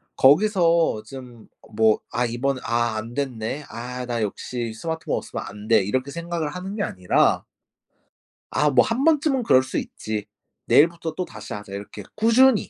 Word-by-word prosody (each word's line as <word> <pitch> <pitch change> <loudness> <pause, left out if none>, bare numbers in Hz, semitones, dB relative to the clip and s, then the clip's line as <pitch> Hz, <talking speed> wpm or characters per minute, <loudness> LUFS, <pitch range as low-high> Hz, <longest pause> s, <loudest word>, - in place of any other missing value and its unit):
거기서 170 - +4
좀 125 -3 -11 0.3
뭐 110 0 +4
'아 125 - 0
이번에 130 +3 -1
아 120 -1 0
안 115 +2 -6
됐네. 135 0 -3
아 125 +2 -6
나 120 -2 -2
역시 115 +3 -3
스마트폰 160 +8 -3
없으면 - - -5
안 105 +1 -9
돼.' 110 -3 +5
이렇게 130 +7 -2
생각을 170 -2 -3
하는 185 +5 -6
게 205 - -1
아니라 90 -1 +1 1.1
'아 150 - +2
뭐 125 -2 +6
1 235 +4 -1
번쯤은 300 -4 +3
그럴 130 - +5
수 130 - -4
있지. 110 -1 -4 0.4
내일부터 165 +1 +3
또다시 180 +1 -6
하자!' 105 -1 -8
이렇게 100 +1 -7
꾸준히 230 +1 +4
130 Hz, 300 characters per minute, -23 LUFS, 115-170 Hz, 1.1 s, 뭐